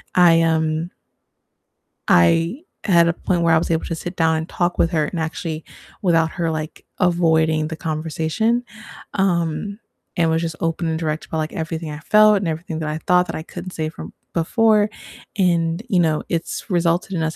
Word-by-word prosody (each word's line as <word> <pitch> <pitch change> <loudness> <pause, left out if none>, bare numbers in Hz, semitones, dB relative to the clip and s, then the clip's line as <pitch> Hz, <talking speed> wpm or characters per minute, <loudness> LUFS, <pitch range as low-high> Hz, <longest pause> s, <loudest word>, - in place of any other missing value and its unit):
I, 170 -2 +6
um 160 +1 0 1.2
I 165 - +3 0.2
had 170 -3 +4
a 170 - +2
point 175 0 -1
where 165 -1 +4
I - - +6
was 160 - -1
able 160 - 0
to 165 - -3
sit 175 +3 -6
down, 160 -1 +2
and 160 +2 -4
talk 175 0 -1
with 170 - +2
her, 155 -3 +1
and 170 - -4
actually 160 0 -4 0.4
without 165 -3 +2
her, 170 -2 -2
like, 155 -1 -5
avoiding 160 -3 +2
the 160 - -5
conversation, 160 +9 -1 0.5
um, 190 +1 0 0.4
and 165 -1 +3
was 160 0 +1
just 165 -2 -3
open, 165 0 -1
and 160 0 -1
direct 155 -1 -2
about, 160 - -4
like, 155 0 -2
everything 160 -1 -4
I 150 - -7
felt 215 +4 +5
and 195 - -2
everything 160 0 -4
that 155 -1 -3
I 155 +1 -3
thought 180 0 +4
that - - -5
I 155 - -5
couldn't 180 +1 -8
say 155 -2 -3
from - - -10 0.2
before, 210 +5 +3 0.5
and, 170 0 +1
you 185 - +3
know, 160 -2 +1
it's 170 +6 -3
resulted 175 +1 +1
in 165 - -1
us 160 0 -1
165 Hz, 190 wpm, -21 LUFS, 160-175 Hz, 1.2 s, I